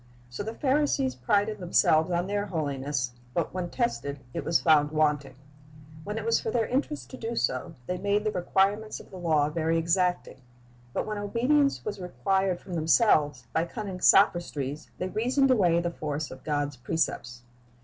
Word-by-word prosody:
So 120 - -5
the 220 +2 -5
Pharisees 270 - +1
prided 205 - 0
themselves 165 -2 +3
on 175 0 0
their 205 +1 -2
holiness, 140 -6 -2 0.2
but 170 -2 -1
when 180 -1 -3
tested, 140 - -2
it - - -3
was 165 - +2
found 150 -3 +4
wanting. 150 -3 0 0.7
When 210 +4 -4
it 220 - -4
was 230 0 +3
for - - -3
their 230 0 +1
interest 285 +5 -2
to 260 - -8
do 230 0 -4
so, 130 - -1
they 180 +4 -3
made 205 +2 +1
the 215 - 0
requirements 200 +4 0
of - - -15
the 190 - -9
law 155 -4 +2
very 165 +1 0
exacting; 175 -3 0 0.5
but - - -2
when 215 -1 -4
obedience 255 +8 +1
was 205 -1 -4
required 180 +3 0
from 185 - -10
them 160 -2 -2
selves, 150 - +3
by 165 - +1
cunning 190 -1 -6
sophistries 155 -7 +3
they 185 - -2
reasoned 255 +6 +2
away 180 -8 +4
the 170 0 -2
force 150 -2 -4
of 130 0 -11
God's 145 -2 -2
precepts. 120 -3 -2
175 Hz, 175 wpm, -27 LUFS, 150-210 Hz, 0.7 s, found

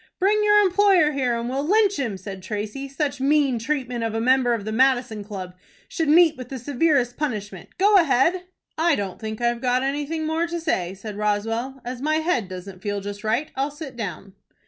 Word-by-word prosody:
"Bring 420 +3 +2
your 415 0 +6
employer 380 -5 +4
here, 255 -4 0
and 235 0 -3
we'll 265 +3 -2
lynch 405 +4 +3
him," 230 -8 -2
said 190 0 -8
Tracy. 210 +7 -5
"Such 275 -1 -2
mean 275 -3 +2
treatment 250 -2 -2
of 225 -1 -2
a - - 0
member 250 0 +3
of 205 -3 -6
the 220 - -3
Madison 245 -3 +2
Club 190 -3 -7 0.3
should 325 -4 -2
meet 320 0 +6
with 255 -2 -9
the 270 - -5
severest 255 -1 +1
punishment. 210 - -5
Go 405 +2 +5
ahead." 335 +3 +3 0.3
"I 330 -1 +3
don't 195 -5 -4
think 220 0 -6
I've 240 0 0
got 250 0 +1
anything 295 +3 -2
more 320 +2 0
to 340 0 -3
say," 190 - -1
said 205 +1 -8
Roswell. 225 +5 -2
"As 245 0 -5
my 310 +2 +1
head 315 - 0
doesn't 185 0 -9
feel 205 0 -2
just 205 +1 -7
right, 235 +8 -1
I'll 275 +2 0
sit 290 -2 -9
down." 200 -3 -6
255 Hz, 200 wpm, -23 LUFS, 215-310 Hz, 0.3 s, your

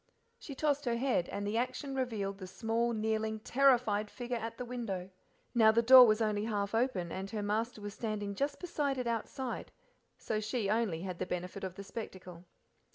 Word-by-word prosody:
She 280 - -8
tossed 290 0 0
her 240 -1 +1
head, 245 -8 +1
and 205 - -3
the 210 +2 -1
action 255 +3 -3
revealed 215 -7 -2
the 185 - -7
small, 225 +4 0
kneeling, 220 0 -1
terrified 240 -6 +3
figure 245 -1 -4
at 230 0 -4
the 250 - -4
window. 205 -7 -4 0.4
Now 220 -3 +6
the 230 +1 +3
door 255 +1 +10
was 215 +1 +3
only 210 -1 0
half 205 -2 -2
open, 225 -8 0
and 190 +1 -4
her 210 0 -3
master 220 +2 -1
was 205 0 -6
standing 210 -3 -3
just 280 +7 -2
beside 295 -6 -1
it 250 - -2
outside, 235 +2 -3 0.5
so 215 - -2
she 215 -1 -1
only 210 -7 0
had 185 -2 -5
the 185 - -2
benefit 180 +2 -4
of 185 -2 -4
the 200 - -7
spectacle. 185 -4 -8
220 Hz, 190 wpm, -33 LUFS, 200-245 Hz, 0.5 s, door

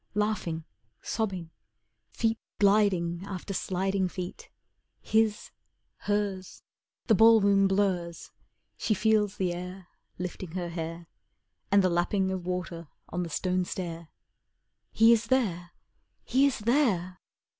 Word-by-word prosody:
Laughing, 210 -7 -1 0.4
sobbing, 185 -7 -3 0.6
Feet 225 -1 -1 0.2
gliding 195 -4 +3
after 195 0 -6
sliding 190 +1 0
feet; 180 0 -7 0.5
His 220 -1 +1 0.5
hers 200 -3 -2 0.4
The 225 - +4
ballroom 200 -3 +6
blurs 190 -4 -1 0.5
She 215 - 0
feels 210 -1 +2
the 180 -2 0
air 180 +1 -8 0.3
Lifting 180 -1 -6
her 180 -2 -3
hair, 165 0 -5 0.7
And 200 -1 +5
the 185 - +3
lapping 190 +2 +1
of 185 -2 -4
water 175 -2 -4 0.2
on 180 - -2
the 170 - -3
stone 185 +3 0
stair. 170 -2 -5 0.8
He 225 +1 +6
is 230 0 0
there! 190 -9 0 0.5
He 270 +2 +3
is 275 - -1
there! 210 - +1
190 Hz, 115 wpm, -28 LUFS, 175-210 Hz, 0.8 s, ballroom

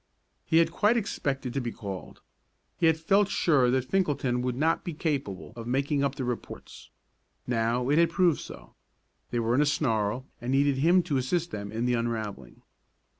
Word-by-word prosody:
He 160 - +3
had 165 0 +4
quite 210 +7 +2
expected 135 - -2
to 135 - -1
be 120 -1 -3
called. 100 -4 -8 0.6
He 165 - +4
had 160 -1 +3
felt 195 +5 +2
sure 140 -10 +3
that 130 0 +1
Finkelton 140 -9 0
would 125 -1 -1
not 160 +5 +1
be 170 - -5
capable 135 - -3
of 115 -1 -7
making 140 +3 0
up 140 -1 0
the 135 -3 -3
reports. 120 -1 -7 0.6
Now 120 +1 0
it 150 +3 +4
had 170 -1 +4
proved 175 -2 +2
so. - - -11 0.6
They 120 - -1
were 115 0 0
in 135 - +4
a - - +4
snarl, 115 -4 0 0.2
and 120 +1 -3
needed 140 0 +3
him 175 +6 +4
to 155 -6 -1
assist 170 +7 -1
them 100 -1 -5
in 115 +2 -2
the 125 - +1
unravelling. 110 - -4
135 Hz, 185 wpm, -28 LUFS, 120-160 Hz, 0.6 s, had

